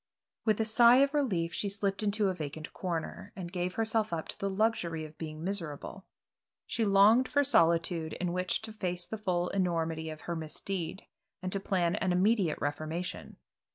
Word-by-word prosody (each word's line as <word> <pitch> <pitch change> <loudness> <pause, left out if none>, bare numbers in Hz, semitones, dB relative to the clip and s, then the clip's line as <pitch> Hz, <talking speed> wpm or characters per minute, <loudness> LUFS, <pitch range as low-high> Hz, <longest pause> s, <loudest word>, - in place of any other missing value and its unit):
With 215 -2 +2
a 220 - +2
sigh 235 +2 +7
of 275 +2 +4
relief 190 - 0
she 205 - -1
slipped 200 +1 0
into 205 -1 +1
a - - 0
vacant 155 -2 -6
corner, 180 +3 -4
and 175 -3 -6
gave 180 0 -2
herself 220 -2 +1
up 165 -2 -3
to - - -3
the 200 - -1
luxury 190 -6 0
of 155 0 -12
being 155 -1 -6
miserable. 185 -1 -5 0.6
She 230 - -1
longed 210 +5 +5
for 285 +1 +2
solitude 165 - +2
in 175 -1 -2
which 180 +3 -1
to 220 -1 -6
face 180 -4 -2
the 220 - -6
full 180 -4 0
enormity 165 -4 -1
of 155 0 -8
her 170 - -4
misdeed, 165 +3 -4 0.4
and 185 - -2
to 195 - 0
plan 180 -3 0
an 185 - 0
immediate 190 -2 +2
reformation. 155 +4 -4
185 Hz, 180 wpm, -31 LUFS, 165-210 Hz, 0.6 s, sigh